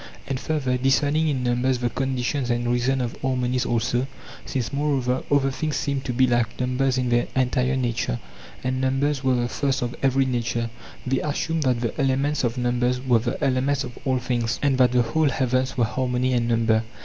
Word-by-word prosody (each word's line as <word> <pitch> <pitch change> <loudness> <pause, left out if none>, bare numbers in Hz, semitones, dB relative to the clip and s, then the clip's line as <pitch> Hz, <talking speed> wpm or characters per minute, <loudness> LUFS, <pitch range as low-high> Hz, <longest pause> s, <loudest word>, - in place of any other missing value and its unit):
+And 135 -2 -2
further, 135 -5 -1
discerning 140 +5 +2
in 135 -4 0
numbers 125 +1 +1
the 120 -1 -1
conditions 130 0 -1
and 120 0 0
reasons 125 +2 +1
of 120 - -5
harmonies 125 -1 0
alsot; 120 +2 0 0.4
since, 130 0 -2
moreover, 135 -3 0
other 135 -1 +3
things 150 +2 -2
seemed 140 0 -2
to - - -1
be 130 +2 +3
like 120 -3 0
numbers 130 +1 +1
in 125 -1 0
their 120 0 +2
entire 130 0 +1
nature, 120 - -1 0.4
and 130 0 -1
numbers 135 +1 0
were 130 -1 +3
the 120 -1 0
first 135 +1 -1
of 120 0 -3
every 135 0 +3
nature, 120 -2 -1 0.3
they 130 0 +1
assumed 160 +2 -1
that 125 -4 +1
the 120 +5 -2
elements 135 +2 +1
of 120 0 0
numbers 125 0 +1
were 125 -2 +3
the 120 +2 -3
elements 135 +2 +1
of 120 -1 -8
all 130 -2 +1
things, 120 -2 -1
and 135 -2 +2
that 125 -2 +5
the 125 -1 +3
whole 150 +6 +1
heavens 130 -1 0
were 120 - +3
harmony 130 +2 0
and 120 -1 +1
number. 115 -1 +2
130 Hz, 195 wpm, -24 LUFS, 120-135 Hz, 0.4 s, that